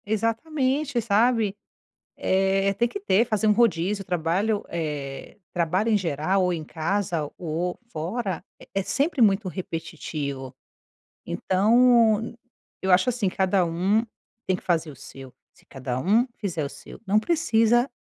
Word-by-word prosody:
Exatamente, 260 +5 0
sabe. 220 -1 +2 0.6
Eh, 195 +1 +1
tem 235 - +2
que 405 - -6
ter, 230 - +3
fazer 220 -2 0
um - - +6
rodízio, 200 -3 +1
trabalho, 180 +5 0
eh, 150 -4 -5
trabalho 180 +5 0
em 215 - +4
geral, 185 +2 0
ou 180 0 +1
em 160 -2 -4
casa 165 -1 -2
ou 175 +1 -3
fora, 185 +3 -3 0.2
é - - -15
é 195 - +1
sempre 285 - -1
muito 200 -2 +4
repetitivo, 155 -7 -5 0.7
então 225 +2 +4
n 230 +1 -7 0.5
eu 190 - +2
acho 185 +6 +5
assim, 235 -5 0
cada 190 0 +1
um 190 +7 +1 0.4
tem 185 - +1
que - - -9
fazer 165 -3 0
o - - -13
seu. 135 0 -12 0.2
Se - - -25
cada 130 -2 -4
um 215 - +3
fizer 175 -7 -3
o 140 - -3
seu, - - -12
não 205 +3 +4
precisa, 240 -4 +2
195 Hz, 145 wpm, -25 LUFS, 165-225 Hz, 0.7 s, um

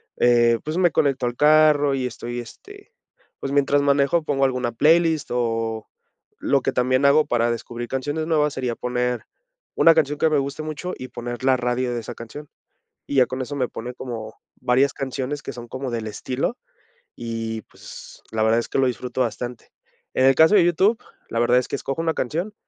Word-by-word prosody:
eh, 120 -1 +4
pues, 155 +3 -3
me 175 -2 +3
conecto 135 -3 +1
al 120 0 -2
carro 150 -1 +5
y 130 -2 -1
estoy 120 0 -5
este, 410 - -12 0.5
pues 135 - -3
mientras 140 0 +3
manejo 140 +3 +2
pongo 135 -3 +1
alguna 125 -2 -1
playlist 160 +4 +3
o 115 -2 -2 0.5
lo 140 -2 +1
que - - 0
también 130 +2 +1
hago 150 +2 +5
para 120 0 +1
descubrir 120 0 -5
canciones 145 +4 -2
nuevas 150 -3 +2
sería 125 -3 -2
poner 125 -1 -2 0.5
una 165 - +6
canción 150 -2 +1
que 160 - +3
me 150 - +2
guste 140 +3 -4
mucho 155 +4 -5
y 130 - -8
poner 120 +1 -6
la 130 -1 +4
radio 125 0 -1
de 120 - -2
esa 120 - -8
canción. 145 +6 -9 0.6
Y 140 - -2
ya 130 - +6
con 130 +1 -5
eso 145 +3 -5
me 125 -3 0
pone 125 +2 -7
como 115 -4 -7 0.3
varias 130 +3 +2
canciones 135 +2 -4
que - - -6
son 120 -1 -10
como 130 0 -5
del 110 -2 -3
estilo 130 - -3 0.6
y, 115 -1 -4
pues, - - -13
la 110 -1 -1
verdad 110 +1 +3
es - - -4
que - - -1
lo 130 - +3
disfruto 125 +1 -3
bastante. 120 0 -4 0.4
En 130 - +3
el 135 - +6
caso 160 +8 +6
de 175 -4 +6
YouTube, 195 +6 +3 0.3
la 115 - -2
verdad 120 +1 +4
es 125 - -4
que - - -3
escojo 135 +5 -3
una 165 -1 0
canción 170 - -2
130 Hz, 195 wpm, -23 LUFS, 120-150 Hz, 0.6 s, una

